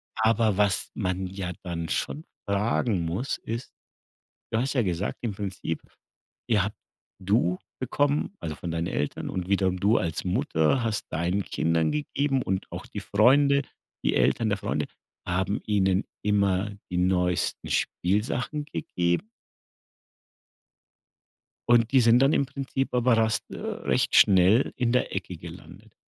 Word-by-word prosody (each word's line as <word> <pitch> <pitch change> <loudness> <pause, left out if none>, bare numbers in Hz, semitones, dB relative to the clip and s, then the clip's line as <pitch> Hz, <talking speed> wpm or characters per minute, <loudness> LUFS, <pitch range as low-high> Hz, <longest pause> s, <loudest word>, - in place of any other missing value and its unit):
Aber 110 -1 +2
was 105 -1 +2
man 95 -2 -2
ja 95 -1 -5
dann 85 -3 -4
schon 155 - -2 0.3
fragen 100 -1 +1
muss, 95 +11 -2
ist: 115 +2 -5 0.8
Du 110 - +2
hast 135 +3 -1
ja 130 - +3
gesagt 95 0 -2
im 115 -3 -1
Prinzip, 95 -5 -4 0.7
ja, 105 -3 +2 0.5
du 90 -2 +2 0.2
bekommen 145 - 0
also, 80 - -4
von 85 - -5
deinen 85 +1 -2
Eltern 75 -5 -2
und 90 -1 -4
wiederum 95 -2 +1
du 105 +4 +4
als 80 -3 -2
Mutter 95 - +1
hast 110 -3 -2
deinen 90 +5 0
Kindern 80 0 +1
gegeben 145 -2 0
und 95 -1 -2
auch - - -6
die - - -6
Freunde, 140 +6 +4 0.4
die - - +2
Eltern 115 - +2
der 100 - 0
Freunde - - -2 0.4
haben 95 +3 0
ihnen 95 -2 +2 0.2
immer 100 -1 +1 0.2
die 90 - -1
neuesten 90 -1 +1
Spielsachen 120 - -1
gegeben. 90 - -1 2.4
Und 120 0 +4
die 135 - +6
sind 115 0 +6
dann 135 +3 +4
im 140 - +2
Prinzip 135 0 -3
aber 125 -1 +3
rast 110 -1 +1
recht - - -1
schnell 95 +6 +5
in 120 -2 +1
der 125 - +1
Ecke - - -4
gelandet. - - -12
105 Hz, 140 wpm, -26 LUFS, 90-120 Hz, 2.4 s, die